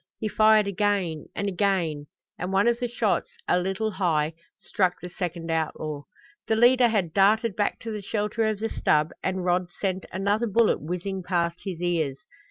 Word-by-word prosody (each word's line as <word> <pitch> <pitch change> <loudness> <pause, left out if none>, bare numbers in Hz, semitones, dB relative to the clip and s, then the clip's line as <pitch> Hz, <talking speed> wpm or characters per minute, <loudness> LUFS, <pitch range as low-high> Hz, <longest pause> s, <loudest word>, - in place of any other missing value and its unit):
He 220 - -2
fired 215 0 +5
again, 200 -5 -1
and 200 - -2
again, 175 -6 0 0.3
and 180 +2 -3
one 195 +3 +3
of 235 0 +2
the 245 - -1
shots, 230 -3 0 0.2
a 180 - +3
little 195 +4 -1
high, 165 -5 0 0.2
struck 185 -5 0
the 180 - -7
second 170 -3 -4
outlaw. 155 -2 -2 0.4
The 220 - +2
leader 245 +2 +5
had 195 -8 0
darted 210 +2 +3
back 205 - 0
to 225 - -5
the 210 -1 -4
shelter 210 +2 -1
of 215 -1 0
the 225 +2 -2
stub 150 +1 +1
and 185 -1 -2
Rod 180 0 +1
sent 190 -2 -2
another 200 +5 0
bullet 225 +2 +2
whizzing 180 +4 -4
past 170 -1 -1
his 180 -3 -4
ears. 160 -6 0
190 Hz, 180 wpm, -26 LUFS, 175-215 Hz, 0.4 s, fired